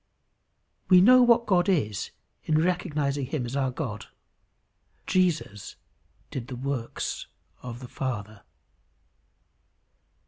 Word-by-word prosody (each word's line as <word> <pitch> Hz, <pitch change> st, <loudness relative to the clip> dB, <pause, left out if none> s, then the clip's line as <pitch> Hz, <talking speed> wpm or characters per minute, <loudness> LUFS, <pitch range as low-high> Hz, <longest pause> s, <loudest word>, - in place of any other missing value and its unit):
We 185 Hz, -2 st, +8 dB
know 250 Hz, +7 st, +7 dB
what 235 Hz, -1 st, +5 dB
God 185 Hz, -2 st, +2 dB
is 105 Hz, -, 0 dB, 0.4 s
in 155 Hz, -, +2 dB
recognizing 150 Hz, -6 st, -1 dB
him 135 Hz, -2 st, -3 dB
as 120 Hz, +3 st, -5 dB
our 135 Hz, -2 st, +1 dB
God. 105 Hz, -5 st, -5 dB, 1.0 s
Jesus 165 Hz, -, 0 dB, 0.6 s
did 125 Hz, -3 st, -5 dB
the 130 Hz, -, -6 dB
works 130 Hz, -2 st, -4 dB, 0.3 s
of 120 Hz, 0 st, -8 dB
the 125 Hz, -, -8 dB
Father. 110 Hz, -6 st, -5 dB
140 Hz, 105 wpm, -26 LUFS, 120-180 Hz, 1.0 s, We